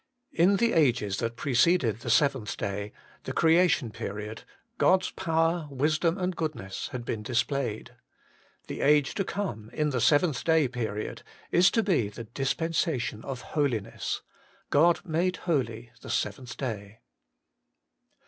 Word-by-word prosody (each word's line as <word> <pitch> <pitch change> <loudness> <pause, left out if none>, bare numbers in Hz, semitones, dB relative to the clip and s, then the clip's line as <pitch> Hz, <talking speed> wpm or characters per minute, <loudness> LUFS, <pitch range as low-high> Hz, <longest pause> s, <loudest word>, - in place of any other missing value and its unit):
In 180 +5 +4
the 235 +2 +2
ages 120 -10 +2
that 115 0 -2
preceded 125 - +2
the 120 - -6
seventh 125 -2 +2
day, 100 +1 -3 0.3
the - - -4
Creation 165 -7 +3
period, 105 0 -6 0.3
God's 185 0 +3
Power, 165 -1 0
Wisdom, 155 +5 +1
and 185 -1 -1
Goodness 155 - -4
had 125 -3 -6
been 110 - -3
displayed. 120 0 -1 0.7
The - - -6
age 145 -1 +4
to 195 - -1
come, 180 - -4
in 150 -1 0
the 125 -3 -1
seventh 145 +1 +3
day 160 -3 +3
period, 110 -4 -4 0.3
is 180 +2 +6
to 225 - +1
be 155 - +1
the 110 +3 -8
dispensation 135 - -1
of 130 -2 -5
holiness: 130 -9 -1 0.5
God 170 +4 +4
made 175 +2 0
holy 120 -8 -1
the - - -10
seventh 125 -3 -3
day. 110 -4 -5
135 Hz, 135 wpm, -28 LUFS, 115-165 Hz, 0.7 s, is